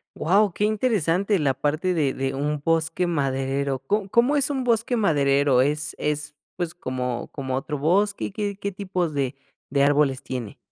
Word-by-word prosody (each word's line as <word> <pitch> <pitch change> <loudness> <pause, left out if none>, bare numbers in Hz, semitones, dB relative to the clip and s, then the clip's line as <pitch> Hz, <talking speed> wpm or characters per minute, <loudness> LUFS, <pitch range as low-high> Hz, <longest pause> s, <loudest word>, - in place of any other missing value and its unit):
Wao, 200 +4 +3
qué 210 - 0
interesante 200 -4 +1
la 140 -3 +2
parte 155 +7 0
de 145 -5 +1
de 135 0 -2
un 145 +1 -2
bosque 165 +2 +1
maderero. 135 -3 -1
¿Co 195 +8 -1
cómo 245 +7 +3
es 285 0 +2
un 265 -3 -2
bosque 235 +1 +1
maderero? 140 - +3
¿Es 150 +2 0
es 150 0 -2 0.2
pues, 175 -2 -3
como 125 -5 -3
como 130 -2 -3
otro 145 +2 -3
bosque? 195 +7 +1
¿Qué 205 -2 -3
qué 200 -1 -4
tipos 185 -5 -2
de 135 -1 -1 0.3
de 140 +1 +2
árboles 140 -2 +3
tiene? 125 -5 -6
155 Hz, 170 wpm, -24 LUFS, 140-200 Hz, 0.3 s, Wao